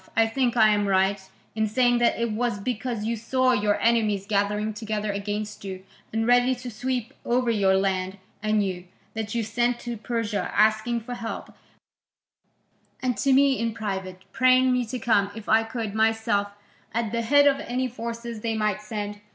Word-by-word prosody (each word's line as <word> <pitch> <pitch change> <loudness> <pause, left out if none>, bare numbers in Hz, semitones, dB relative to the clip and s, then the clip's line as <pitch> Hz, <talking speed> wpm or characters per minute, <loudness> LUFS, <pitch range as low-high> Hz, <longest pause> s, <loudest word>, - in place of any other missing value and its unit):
I 225 - +6
think 240 +1 0
I 220 -1 +6
am 205 -1 +2
right 195 +1 +2 0.3
in 220 0 0
saying 245 +2 +2
that 240 - +2
it 235 -1 0
was 230 0 -1
because 230 +1 -3
you 230 +1 0
saw 255 +3 +1
your 210 -3 +1
enemies 215 -4 +2
gathering 210 +1 0
together 215 -1 -3
against 205 +1 -4
you, 190 -1 -6 0.3
and 225 +1 0
ready 245 +2 +4
to 245 0 -8
sweep 245 +1 -3
over 245 0 +1
your 195 -3 +3
land 190 0 -1 0.2
and 215 -1 +1
you, 180 -2 -4 0.3
that 220 +1 -4
you 230 - 0
sent 240 +3 0
to 240 -1 -5
Persia 225 -2 -2
asking 220 +2 +3
for 245 +3 -7
help, 230 -2 -6 1.5
and 250 -2 -1
to 275 - +2
me 270 0 +4
in 230 -1 -1
private, 190 -4 -5
praying 255 +1 +4
me 250 -1 +1
to 255 +3 -4
come, 220 -5 +2
if 220 -2 -9
I 220 +1 +5
could, 225 -2 -4
myself, 220 -2 +1 0.5
at 230 -2 -1
the 235 - -1
head 285 +5 +5
of 275 -1 +4
any 255 +2 -2
forces 235 -1 -6
they 225 0 -1
might 210 -1 0
send. 210 -1 -5
225 Hz, 180 wpm, -25 LUFS, 210-240 Hz, 1.5 s, I